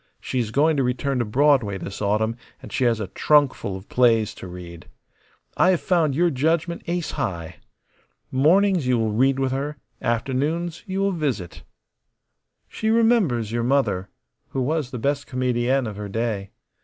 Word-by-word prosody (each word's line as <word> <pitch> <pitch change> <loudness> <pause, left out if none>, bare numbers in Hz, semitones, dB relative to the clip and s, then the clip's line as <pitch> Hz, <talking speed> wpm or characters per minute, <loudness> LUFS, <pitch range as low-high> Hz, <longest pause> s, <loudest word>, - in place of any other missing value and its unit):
She 130 - -3
is 115 -3 -1
going 150 +6 +2
to 135 - +2
return 125 +2 -1
to 120 - 0
Broadway 125 -3 +2
this 95 +1 -7
autumn, 110 +2 +1 0.2
and - - -11
she 130 - +1
has 115 -2 +2
a 100 -4 -4
trunkful 140 -8 +2
of 95 - -13
plays 115 -3 +3
to - - -9
read. 90 -2 -10 0.7
I 180 - +4
have 180 -3 +2
found 165 -6 +2
your 175 +2 +3
judgment 165 +5 0
ace 175 -1 -2
high. 85 -2 -4 0.7
Mornings 175 +3 +3
you 125 -1 +3
will 110 -1 0
read 130 +5 +2
with 135 -1 0
her; 140 +3 -3 0.2
afternoons 140 +8 -1
you 190 0 -2
will 200 0 +2
visit. 140 - -3 1.1
She 220 - -3
remembers 220 - +2
your 120 0 -1
mother, 120 -7 +1 0.4
who 130 - -2
was 150 0 -1
the 125 - -5
best 140 +4 -1
comedienne 125 0 0
of 105 -2 -6
her 105 -1 -5
day. 105 -2 -2
130 Hz, 170 wpm, -23 LUFS, 110-155 Hz, 1.1 s, I